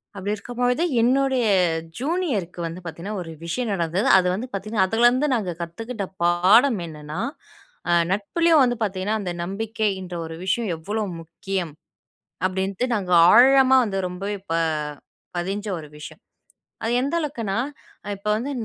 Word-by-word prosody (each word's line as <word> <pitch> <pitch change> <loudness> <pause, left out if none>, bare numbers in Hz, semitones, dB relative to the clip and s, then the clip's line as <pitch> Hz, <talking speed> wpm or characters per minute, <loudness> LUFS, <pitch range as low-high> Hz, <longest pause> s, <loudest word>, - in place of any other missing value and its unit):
அப்படிருக்கும்பொழுது 240 - -1 0.2
என்னுடைய 260 0 +2 0.5
ஜூனியருக்கு 265 - -2
வந்து 165 +2 -5
பார்த்தீங்கன்னா, 175 +6 -5
ஒரு 165 - -7
விஷயம் 220 +6 -2
நடந்தது. 175 +5 0
அது 185 -1 +3
வந்து 220 +7 -3
பார்த்தீங்கன்னா 200 0 0
அதுல 225 +4 +4
இருந்து 255 +5 +1
நாங்க 195 -6 -2
கத்துக்கிட்ட 205 +6 -5 0.2
பாடம் 195 +8 +5
என்னென்னா, 150 +1 -7 0.7
அ - - +4 0.2
நட்புலயும் 310 - +3
வந்து 245 -1 +1
பார்த்தீங்கன்னா, 200 +1 -1
அந்த 180 -3 -3
நம்பிக்கைன்ற 195 -1 -3
ஒரு 160 0 -7
விஷயம் 215 +1 0
எவ்ளோ 210 +7 -3 0.2
முக்கியம் 175 0 -4 0.7
அப்டின்ட்டு, 190 +4 -2
நாங்க 190 -4 -3 0.2
ஆழமா 265 +2 +7
வந்து 195 -2 -2
ரொம்பவே 195 +3 -4
ப - - +2 0.8
பதிஞ்ச 195 +4 -3
ஒரு 155 - -10
விஷயம். 150 - -10 0.6
அது 225 - 0
எந்த 280 +5 -1
அளவுக்குனா 230 -10 -3 0.5
அ - - -9
இப்ப 200 +2 -9
வந்து 260 +6 -3
205 Hz, 135 wpm, -23 LUFS, 180-245 Hz, 0.8 s, ஆழமா